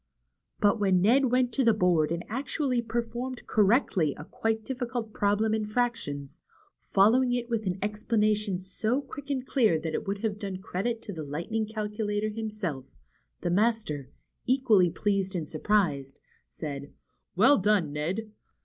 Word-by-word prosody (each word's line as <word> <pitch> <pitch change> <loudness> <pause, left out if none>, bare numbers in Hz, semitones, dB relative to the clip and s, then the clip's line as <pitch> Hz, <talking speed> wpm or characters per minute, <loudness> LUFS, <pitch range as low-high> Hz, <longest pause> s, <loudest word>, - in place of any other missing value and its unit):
But 210 +2 +3
when 190 -3 +3
Ned 240 +9 +4
went 250 -1 +2
to 265 - +2
the 230 -3 +4
board 175 -6 +2
and 170 +1 -2
actually 260 +1 -1
per 235 +1 -1
formed 245 +2 -6
correctly 200 - +2
a 150 - -8
quite 220 +3 -2
difficult 245 -4 -4
problem 205 +2 +1
in 215 -1 -1
fractions, 215 - -2 0.4
following 245 +6 +3
it 240 -1 -2
with 220 -3 -1
an 185 0 -1
explanation 210 -2 0
so 215 +7 -1
quick 285 +1 -10
and 265 -2 -1
clear 230 - +3
that 160 0 -4
it - - -3
would 200 +2 -3
have 210 -2 -1
done 195 -3 -4
credit 225 +5 -3
to 205 - -6
the 160 - -6
Lightning 170 +10 -3
Cal 215 -1 -3
culator 210 0 -2
himself, 210 -12 -4 0.5
the 175 - -1
master, 200 - 0 0.4
equally 235 -8 +4
pleased 195 +1 -1
and 165 -4 -2
surprised, 155 -6 0 0.3
said: 140 -2 -6 0.5
^'^Well 230 +3 +6
done, 190 -8 +2
Ned! 185 +9 -3
210 Hz, 160 wpm, -28 LUFS, 180-235 Hz, 0.5 s, ^'^Well